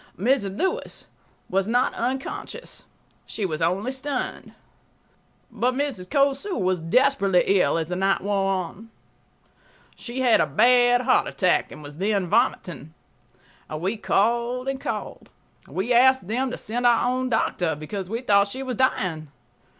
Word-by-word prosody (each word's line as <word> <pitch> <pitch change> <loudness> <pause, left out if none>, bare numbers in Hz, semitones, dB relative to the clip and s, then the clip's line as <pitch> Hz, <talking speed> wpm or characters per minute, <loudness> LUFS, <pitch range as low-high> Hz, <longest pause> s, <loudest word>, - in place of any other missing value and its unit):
Mrs. 200 -2 0
Lewis 380 +7 -2 0.4
was 195 +1 0
not 245 +3 +1
unconscious; 265 - -5 0.4
she 210 - -4
was 160 -3 -3
only 190 +9 0
stunned. 265 0 -5 1.0
But 240 +3 0
Mrs. 265 -10 -3
Cosu 280 +7 +1
was 185 -1 0
desperately 200 +1 +2 0.2
ill 140 -1 +2
as 165 0 -3
the 180 - -2
night 195 +1 +1
wore 195 -1 0
on. 190 +4 -4 1.1
She 250 +2 -6
had 245 -3 +4
a - - +1
bad 245 0 +4
heart 255 +1 +2
attack 185 -2 +1
and 150 - -11
was 145 +2 -11
then 200 -2 0
vomiting. 170 - -1 0.8
We 175 +8 -2
called 235 +4 0
and 270 0 -3
called. - - -5 0.4
We 210 +7 -1
asked 260 -3 +4
them1to 250 +4 -2
send 240 +3 -1
our 235 0 +3
own 255 +1 -1
doctor, 180 -8 0
because 180 +5 -6
we 230 +3 -3
thought 200 -3 +4
she 260 +7 -6
was 255 -3 -4
dying 175 -11 0
225 Hz, 140 wpm, -24 LUFS, 185-255 Hz, 1.1 s, had